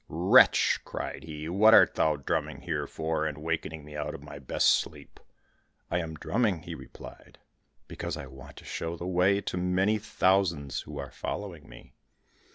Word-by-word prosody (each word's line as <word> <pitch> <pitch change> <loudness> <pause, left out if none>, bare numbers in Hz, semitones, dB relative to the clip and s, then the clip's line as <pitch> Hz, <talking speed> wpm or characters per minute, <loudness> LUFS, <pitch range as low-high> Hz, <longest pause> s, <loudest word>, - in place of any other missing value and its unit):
"Wretch!" 85 +4 +5
cried 70 - -6
he; 75 -1 -7
"what 105 +6 +6
art - - +6
thou 80 -1 +2
drumming 70 - -3
here 75 -4 -3
for, 80 0 -2
and 75 -2 -5
wakening 80 -1 -4
me 75 0 -11
out 75 0 -4
of 70 - -10
my 75 -1 -9
best 65 - +2
sleep?" - - -3 0.7
"I 90 - +1
am 80 -2 -5
drumming," 100 -1 0
he - - -7
replied, - - -12 0.5
"because - - -5
I - - -7
want 65 0 -13
to - - -12
show 85 +1 -4
the 85 - -6
way 95 +2 +2
to 90 - -4
many 95 +4 +1
thousands 95 - +1
who 75 -1 -9
are 70 -3 -6
following 95 -7 -6
me." - - -14
80 Hz, 170 wpm, -28 LUFS, 75-90 Hz, 0.7 s, what